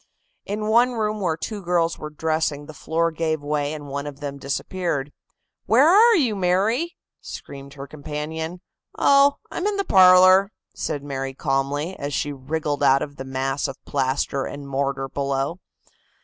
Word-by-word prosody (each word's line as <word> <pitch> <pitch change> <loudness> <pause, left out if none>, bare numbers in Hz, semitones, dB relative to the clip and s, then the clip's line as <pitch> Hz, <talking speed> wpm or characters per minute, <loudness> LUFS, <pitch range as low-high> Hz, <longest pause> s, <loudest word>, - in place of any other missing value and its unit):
In 210 +1 -3
one 235 +3 +4
room 215 -2 -1
where 165 -4 0
two 210 +4 -5
girls 170 -2 0
were 150 - -6
dressing 155 -1 -1
the 155 - -10
floor 165 +3 -1
gave 160 -1 -1
way 145 0 -1
and 150 -2 -7
one 140 +1 -4
of 140 -1 -8
them 140 -1 -6
disappeared. 145 +1 -3 0.6
"Where 260 +7 +5
are 440 +6 +7
you, 250 - +2
Mary?" 205 - 0 0.2
screamed 140 0 -10
her 140 -1 -7
companion. 155 +4 -6 0.4
"Oh, 280 0 +5 0.2
I'm 370 - -2
in 415 -1 -1
the 395 - -1
parlor," 185 +1 +7 0.2
said 145 - -4
Mary 135 -1 -4
calmly, 145 +4 -1
as 145 0 -3
she 145 - -1
wriggled 145 +2 -3
out 135 +1 +4
of 145 -1 -8
the - - -5
mass 135 +1 -2
of - - -7
plaster 135 0 -1
and 145 -1 -7
mortar 135 0 -2
below. 140 +4 -2
155 Hz, 165 wpm, -23 LUFS, 140-190 Hz, 0.6 s, are